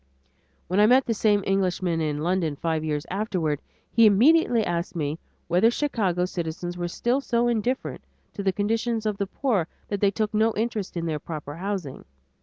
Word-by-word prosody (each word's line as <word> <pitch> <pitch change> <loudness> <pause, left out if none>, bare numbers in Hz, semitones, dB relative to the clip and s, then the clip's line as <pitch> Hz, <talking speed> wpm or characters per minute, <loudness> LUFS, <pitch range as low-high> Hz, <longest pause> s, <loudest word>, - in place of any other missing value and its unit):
When 185 +3 +1
I 210 - +7
met 255 +3 +5
the 230 - 0
same 205 -2 +2
Englishman 185 -3 0
in 150 -1 -1
London 170 -3 0
five 160 +1 -1
years 150 -2 -2
afterward, 180 -8 -1 0.3
he 230 -1 +6
immediately 240 +2 +4
asked 170 +1 -2
me 155 -1 -2 0.3
whether 180 +7 +4
Chicago 210 - 0
citizens 175 0 -4
were 175 0 -3
still 240 +9 0
so 240 -2 +1
indifferent 240 +2 -1 0.3
to - - -5
the 195 -1 +2
conditions 225 +3 -1
of 210 -2 -1
the 200 - -2
poor 205 - 0 0.2
that 200 -1 -2
they 200 - +5
took 215 +2 -2
no 220 +1 +2
interest 215 -4 -2
in 170 - -2
their 155 -2 -2
proper 150 -1 -7
housing. 185 -7 -4
195 Hz, 180 wpm, -25 LUFS, 170-225 Hz, 0.3 s, I